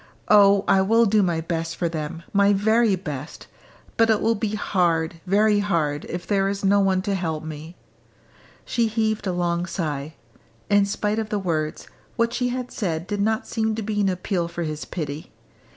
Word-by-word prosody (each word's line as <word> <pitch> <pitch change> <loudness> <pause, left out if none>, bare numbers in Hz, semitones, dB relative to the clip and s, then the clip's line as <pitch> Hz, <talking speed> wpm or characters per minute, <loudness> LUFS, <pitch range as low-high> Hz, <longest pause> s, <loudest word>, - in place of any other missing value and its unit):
Oh, 200 -1 +6
I 190 - +4
will 225 +4 +4
do 215 0 +3
my 170 -4 0
best 165 0 -3
for 175 - -1
them, 165 +1 -5
my 200 0 +4
very 220 +1 +3
best! 150 -5 -7 0.5
But 225 0 +4
it 220 -2 +4
will 225 - +2
be 215 -1 -2
hard, 170 -5 0
very 205 +2 +3
hard, 160 -8 -1
if 175 0 -6
there 195 -1 +1
is 200 0 -3
no 200 +1 +4
one 190 -1 +2
to 200 0 -1
help 160 -5 -2
me!" 155 +2 -8 0.9
She 235 -1 +1
heaved 220 -1 -1
a - - +1
long 175 0 -1
sigh. 155 -4 -4 0.6
In 205 0 +5
spite 210 +1 -1
of 220 -1 -3
the 210 - -1
words, 160 -5 -2 0.3
what 230 0 +1
she 250 -1 0
had 250 0 -4
said 170 -6 -2
did 205 +1 -3
not 220 +1 0
seem 220 -1 -1
to 220 - -4
be 210 0 -1
an 195 - +2
appeal 180 -1 -1
for 170 0 -5
his 155 -1 -4
pity. 150 -3 -6
195 Hz, 190 wpm, -23 LUFS, 165-210 Hz, 0.9 s, Oh